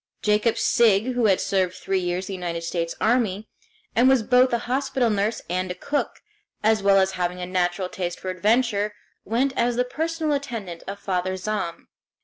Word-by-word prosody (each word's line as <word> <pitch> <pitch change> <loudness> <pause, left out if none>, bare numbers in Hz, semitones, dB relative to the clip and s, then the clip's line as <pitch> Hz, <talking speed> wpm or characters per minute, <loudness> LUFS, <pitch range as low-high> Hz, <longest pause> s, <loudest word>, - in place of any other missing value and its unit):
Jacob 215 +2 +2
Sigg, 230 +1 +3
who 245 -3 +2
had 190 -2 +3
served 185 -2 0
three 195 -1 -1
years 180 +1 -2
in 195 - -5
the 180 -2 -4
United 170 0 -3
States 170 0 -2
Army, 220 -3 +1 0.5
and 245 +3 +5
was 265 -4 +4
both 250 +3 +4
a 235 - +2
hospital 255 -2 0
nurse 210 +2 -1
and 185 +1 -2
a 180 - -4
cook, 285 +10 -3 0.4
as 215 0 +3
well 200 0 +5
as 190 0 +3
having 180 -1 -2
a 180 - -3
natural 180 0 0
taste 175 -1 -4
for 185 - -4
adventure, 210 +2 +1 0.3
went 255 +6 +1
as 240 0 +1
the 250 +1 +1
personal 320 +3 -2
attendant 230 -12 -4
of 200 +1 -5
Father 185 -2 -2
Zahm. 190 -3 -3
205 Hz, 185 wpm, -24 LUFS, 185-240 Hz, 0.5 s, and